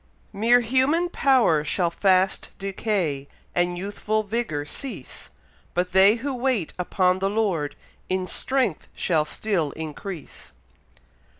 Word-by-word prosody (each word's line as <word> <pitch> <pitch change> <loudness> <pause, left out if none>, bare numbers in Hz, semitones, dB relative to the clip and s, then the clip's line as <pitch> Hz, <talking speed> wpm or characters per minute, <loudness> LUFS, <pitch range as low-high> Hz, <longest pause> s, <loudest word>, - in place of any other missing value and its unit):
Mere 230 +4 +4
human 265 +9 +2
power 250 - +3
shall 170 +3 0
fast 190 +1 +2
decay, 190 -8 -2 0.3
And 175 0 +1
youthful 205 +3 -1
vigour 205 -9 -2
cease; 195 - -7 0.5
But 180 +1 0
they 190 +3 +6
who 270 +4 -3
wait 250 -8 -1
upon 185 +1 +2
the 195 +1 +1
Lord, 195 -9 0 0.3
In 185 0 0
strength 250 - -1
shall 160 -4 +1
still 175 -3 -1
increase. 160 - -8
195 Hz, 115 wpm, -24 LUFS, 175-230 Hz, 0.5 s, they